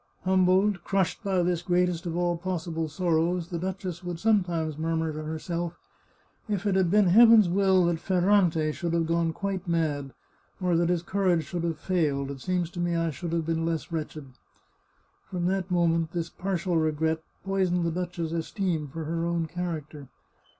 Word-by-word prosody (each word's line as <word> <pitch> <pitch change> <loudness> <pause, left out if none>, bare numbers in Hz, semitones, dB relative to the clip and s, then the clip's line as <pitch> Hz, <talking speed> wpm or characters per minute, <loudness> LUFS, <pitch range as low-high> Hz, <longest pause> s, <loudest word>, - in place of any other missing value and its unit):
Humbled, 185 +1 +3
crushed, 195 +1 0
by 190 -3 +1
this 175 -1 0
greatest 175 -1 0
of 170 0 -3
all 175 0 +1
pos 180 0 -3
sible 165 -2 -3
sorrows, 170 +1 0
the 170 - -3
duchess 185 -1 -4
would 175 -1 -4
sometimes 175 -8 +1
murmur 160 0 -1
to 155 - -5
her 155 +1 -4
self, 170 +1 -4 0.4
" - - -34
If 205 -1 -1
it 200 - +2
had 190 -2 +2
been 205 +2 +4
Heaven's 225 +1 +7
will 190 0 +3
that 170 -1 0
Ferrante 175 -3 +2
should 170 +2 -3
have 165 -1 +2
gone 165 0 +1
quite 190 +1 -4
mad, 150 -5 -1 0.4
or 180 -2 +1
that 170 +1 +2
his 175 -1 +1
courage 185 -3 +1
should 170 +3 -4
have 165 -2 -1
failed, 150 -5 0
it 135 -2 -8
seems 180 0 -1
to 175 - -7
me 175 0 0
I 165 -1 0
should 170 +3 -5
have 165 -1 0
been 165 0 -1
less 165 0 -2
wretched." 155 -2 -4 1.0
From 180 -2 -2
that 190 0 0
moment, 165 -2 +1
this 170 -1 -3
partial 180 -2 -1
regret 160 0 0 0.2
poisoned 185 -2 +1
the 165 - 0
duchess's 170 -1 -3
esteem 165 -1 -2
for 160 +4 -6
her 165 +2 -2
own 170 -1 0
character. 155 -4 -5
170 Hz, 185 wpm, -27 LUFS, 165-185 Hz, 1.0 s, Heaven's